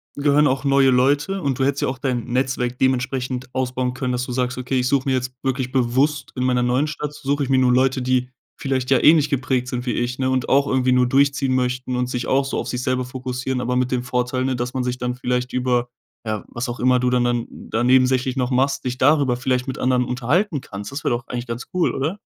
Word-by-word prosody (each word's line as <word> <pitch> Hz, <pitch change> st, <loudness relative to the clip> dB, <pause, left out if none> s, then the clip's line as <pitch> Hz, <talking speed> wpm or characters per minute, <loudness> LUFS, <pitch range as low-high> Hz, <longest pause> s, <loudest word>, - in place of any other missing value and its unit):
gehören 145 Hz, +1 st, +3 dB
auch 130 Hz, 0 st, 0 dB
neue 140 Hz, -1 st, +4 dB
Leute 145 Hz, +9 st, +2 dB
und 140 Hz, -5 st, -1 dB
du -, -, +2 dB
hättest 140 Hz, +1 st, 0 dB
ja -, -, +1 dB
auch 130 Hz, 0 st, -4 dB
dein 125 Hz, -4 st, -1 dB
Netzwerk 125 Hz, -1 st, -1 dB
dementsprechend 130 Hz, -1 st, -1 dB
ausbauen 125 Hz, -1 st, -1 dB
können, 130 Hz, -1 st, -2 dB
dass 125 Hz, 0 st, -1 dB
du 125 Hz, -, -6 dB
sagst: 125 Hz, 0 st, -1 dB
„Okay, 130 Hz, +1 st, -1 dB
ich 125 Hz, -, 0 dB
suche 140 Hz, 0 st, +1 dB
mir 135 Hz, -, +2 dB
jetzt 125 Hz, 0 st, -2 dB
wirklich 130 Hz, -1 st, -1 dB
bewusst 135 Hz, +3 st, +1 dB
in 125 Hz, -, -2 dB
meiner 125 Hz, -1 st, +2 dB
neuen 125 Hz, +5 st, +1 dB
Stadt 150 Hz, 0 st, -5 dB
suche 140 Hz, 0 st, -1 dB
ich 135 Hz, -, -4 dB
mir 130 Hz, -, +4 dB
nun 125 Hz, -1 st, +4 dB
Leute, 130 Hz, 0 st, +2 dB
die 125 Hz, 0 st, 0 dB, 0.3 s
vielleicht 130 Hz, -2 st, -2 dB
ja 135 Hz, -, +5 dB
ähnlich 150 Hz, -1 st, +6 dB
geprägt 130 Hz, -2 st, 0 dB
sind 125 Hz, 0 st, -4 dB
wie 120 Hz, -, -1 dB
ich“, 120 Hz, +2 st, -2 dB
ne? 130 Hz, -1 st, 0 dB
Und 130 Hz, -1 st, -1 dB
auch 140 Hz, +1 st, +4 dB
irgendwie 130 Hz, 0 st, +1 dB
nur 125 Hz, 0 st, +3 dB
durchziehen 135 Hz, 0 st, +2 dB
möchten 125 Hz, 0 st, -1 dB
und 125 Hz, 0 st, 0 dB
sich 125 Hz, -1 st, -3 dB
auch 135 Hz, +1 st, +2 dB
so 135 Hz, -, -3 dB
auf -, -, -3 dB
sich 125 Hz, 0 st, -3 dB
selber 130 Hz, 0 st, -1 dB
fokussieren, 125 Hz, 0 st, -4 dB
aber 125 Hz, +1 st, -1 dB
mit 125 Hz, 0 st, 0 dB
dem 125 Hz, -1 st, 0 dB
Vorteil, 125 Hz, 0 st, -1 dB
ne, 130 Hz, -1 st, 0 dB
dass 125 Hz, +1 st, -3 dB
man 130 Hz, -, -1 dB
sich 125 Hz, 0 st, -2 dB
dann 125 Hz, 0 st, -2 dB
vielleicht 125 Hz, 0 st, -2 dB
über, 125 Hz, -1 st, 0 dB, 0.4 s
ja 110 Hz, -1 st, -3 dB
was 120 Hz, +2 st, -5 dB
auch 120 Hz, -, -5 dB
immer 125 Hz, 0 st, +3 dB
du 125 Hz, 0 st, +1 dB
dann 125 Hz, -1 st, +2 dB
dann 120 Hz, -1 st, 0 dB
da 115 Hz, +2 st, -3 dB
nebensächlich 130 Hz, 0 st, +3 dB
noch 125 Hz, 0 st, 0 dB
machst, 135 Hz, +2 st, 0 dB
dich 125 Hz, 0 st, -2 dB
darüber 135 Hz, -2 st, +3 dB
vielleicht 130 Hz, 0 st, -1 dB
mit 130 Hz, -, -4 dB
anderen 125 Hz, -1 st, +2 dB
unterhalten 135 Hz, -, 0 dB
kannst. 100 Hz, 0 st, -8 dB
Das 140 Hz, +1 st, -5 dB
wäre -, -, +1 dB
doch 120 Hz, +1 st, -4 dB
eigentlich 120 Hz, -1 st, -4 dB
ganz 115 Hz, +1 st, -5 dB
cool, 180 Hz, -, +2 dB
oder? 155 Hz, +9 st, -2 dB
130 Hz, 250 wpm, -21 LUFS, 125-135 Hz, 0.4 s, ähnlich